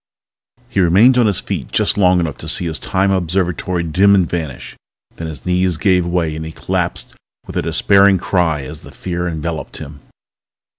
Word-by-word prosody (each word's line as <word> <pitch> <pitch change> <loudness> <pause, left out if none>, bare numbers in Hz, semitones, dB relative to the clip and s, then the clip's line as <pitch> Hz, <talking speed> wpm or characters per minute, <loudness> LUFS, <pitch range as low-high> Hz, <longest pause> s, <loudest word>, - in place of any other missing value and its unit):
He 120 -5 -2
remained 95 +9 +5
on 120 - +4
his 100 - +1
feet - - -5
just - - +1
long 90 -3 +3
enough 80 -4 -2
to 80 - -9
see 90 +2 -1
his 80 -2 -3
Time 95 +1 0
Observatory 90 -1 -1
dim 95 +5 +4
and 95 -3 +2
vanish. 80 -7 -5 0.4
Then 80 - -5
his 80 -4 -9
knees 90 -1 +1
gave 90 -1 +2
way 85 -3 -1
and 80 - -5
he 80 - -6
collapsed - - -3 0.3
with - - -10
a - - +1
despairing 100 -1 +4
cry 85 -6 0
as 75 +3 -8
the - - -13
fear 90 -1 -4
enveloped 80 -1 -5
him 70 0 -9
90 Hz, 185 wpm, -17 LUFS, 80-95 Hz, 0.4 s, remained